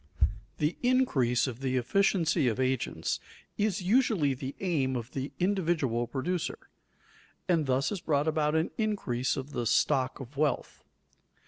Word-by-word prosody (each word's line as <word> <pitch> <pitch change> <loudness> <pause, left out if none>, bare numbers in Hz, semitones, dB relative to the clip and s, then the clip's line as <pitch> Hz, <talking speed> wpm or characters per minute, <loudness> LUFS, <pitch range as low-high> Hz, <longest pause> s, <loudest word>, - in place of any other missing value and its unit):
The 150 +3 0
increase 245 - +2
of 130 -3 -5
the 130 -1 0
efficiency 165 - +2
of 120 +1 0
agents 130 -1 -1 0.4
is 205 -2 0
usually 195 - +3
the 130 +1 -6
aim 145 -9 0
of 120 0 -4
the 135 +1 -4
individual 165 - +1
producer, 155 +8 -2 0.9
and 165 -5 +2
thus 130 +5 +1
is 200 -4 -3
brought 145 -1 +1
about 155 -1 +1
an 160 +1 +1
increase 140 - 0
of 135 +2 -5
the 120 -4 -2
stock 130 +4 +2
of 135 +1 -9
wealth. 150 0 -1
145 Hz, 140 wpm, -29 LUFS, 130-180 Hz, 0.9 s, usually